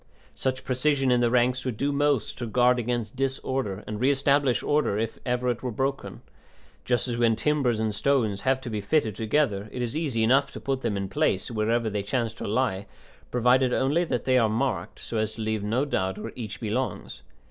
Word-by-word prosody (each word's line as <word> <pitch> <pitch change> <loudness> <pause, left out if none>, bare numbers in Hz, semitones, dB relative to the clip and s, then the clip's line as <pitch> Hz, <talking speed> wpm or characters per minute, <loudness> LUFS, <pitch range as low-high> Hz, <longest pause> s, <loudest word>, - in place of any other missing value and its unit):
Such 130 -1 -2
precision 135 +1 +1
in 125 - +4
the 120 - +3
ranks 125 +1 +2
would 125 -5 -3
do 140 +4 0
most 145 -3 +1
to 120 - -3
guard 125 +2 +3
against 120 0 -2
disorder 130 -6 -2
and 105 -1 -5
re 130 +3 +3
establish 140 -2 +2
order 145 -8 +1
if 110 +1 -3
ever 125 0 0
it 120 -1 -2
were 130 - -2
broken; 135 +4 -3 0.6
just 125 +1 +1
as 120 -1 -2
when 115 -1 +3
timbers 135 -5 +1
and 110 -1 0
stones 110 -4 +1
have 130 0 +2
to 125 - -6
be 105 -1 -2
fitted 110 -1 +1
together 110 -3 0
it 125 - -3
is 120 +2 -3
easy 140 -8 0
enough 135 +4 +3
to - - -6
put 135 -1 -2
them 105 - -1
into 95 -1 -4
place, 95 +5 +1
wherever 115 +1 0
they 105 -1 -1
chance 115 +2 -1
to - - -6
lie, 105 -3 0 0.4
provided 125 +1 +3
only 145 +6 +2
that 125 -8 -2
they 130 -1 +4
are 115 -2 +3
marked 110 +2 -2
so 115 - -4
as 110 0 -1
to 115 - -8
leave 110 -1 -1
no 115 +7 0
doubt 95 -9 -1
where - - -6
each 110 -4 -6
belongs. 120 +3 -3
125 Hz, 210 wpm, -26 LUFS, 110-135 Hz, 0.6 s, in